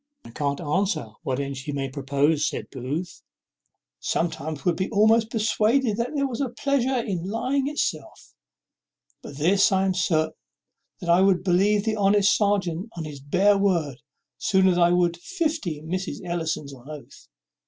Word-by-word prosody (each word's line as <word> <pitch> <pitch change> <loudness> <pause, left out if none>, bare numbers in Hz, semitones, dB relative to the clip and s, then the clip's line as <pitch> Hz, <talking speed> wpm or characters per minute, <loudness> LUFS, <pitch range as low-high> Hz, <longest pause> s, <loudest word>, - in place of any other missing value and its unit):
"I - - -11
can't 140 -2 -2
answer 175 - -1
what 130 0 -2
end 140 -1 -4
she 140 +3 -5
may 140 -1 -2
propose," 140 +3 +1
said - - -7
Booth. 145 +7 -5 0.8
"Sometimes 160 -2 -2
one 180 - +4
would 170 - -5
be 190 - -1
almost 220 +1 +3
persuaded 220 +1 +1
that 235 +1 -1
there 280 -1 +1
was 255 +1 -4
a 270 - 0
pleasure 265 +1 0
in 185 -3 -3
lying 260 +5 0
itself. 295 +1 -4 0.9
But 140 - -10
this 190 +8 +3
I 190 0 +2
am 190 - +1
certain, 160 -3 +1 0.7
that 175 - -5
I 175 +2 +5
would 190 -2 +3
believe 200 +3 +3
the 220 -1 0
honest 200 0 +4
serjeant 200 -2 0
on 165 - -3
his 150 -2 -8
bare 195 +8 +3
word 165 -9 0 0.4
sooner 190 -2 +3
than 175 - +1
I 170 0 +5
would 175 -1 +2
fifty 305 - -3
Mrs. 185 +4 -4
Ellisons 160 -4 -3
on 130 +2 -14
oath. 150 -2 -11
185 Hz, 165 wpm, -24 LUFS, 155-210 Hz, 0.9 s, I